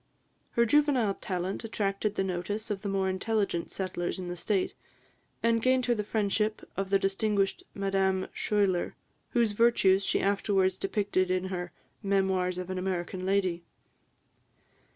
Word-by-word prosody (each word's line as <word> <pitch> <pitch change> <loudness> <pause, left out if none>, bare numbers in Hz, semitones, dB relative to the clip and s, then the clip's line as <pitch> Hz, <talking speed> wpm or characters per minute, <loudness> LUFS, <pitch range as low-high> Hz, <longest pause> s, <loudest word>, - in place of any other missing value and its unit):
Her 235 - +4
juvenile 265 -5 +3
talent 185 +2 -3
attracted 210 -1 -1
the - - +1
notice 190 +4 -3
of 195 -2 -2
the 200 - -3
more 195 -1 +1
intelligent 190 -2 -1
settlers 185 -2 -3
in 180 -1 -5
the 175 - -3
State, 190 +2 0 0.7
and 230 0 +3
gained 255 +1 +3
her 245 - +3
the 210 -3 -2
friendship 215 0 0
of 195 0 -2
the 195 - +5
distinguished 195 +1 0
Madame 195 -1 +1
Schuyler, 200 -4 +1 0.4
whose 235 -3 +3
virtues 205 -3 +4
she - - +1
afterwards 195 -2 +1
depicted 195 -2 0
in 185 0 0
her 175 -1 -4 0.3
"Memoirs 190 -3 +1
of 185 0 -4
an 185 - -2
American 185 0 -3
Lady." 185 -3 +1
195 Hz, 145 wpm, -29 LUFS, 185-210 Hz, 0.7 s, the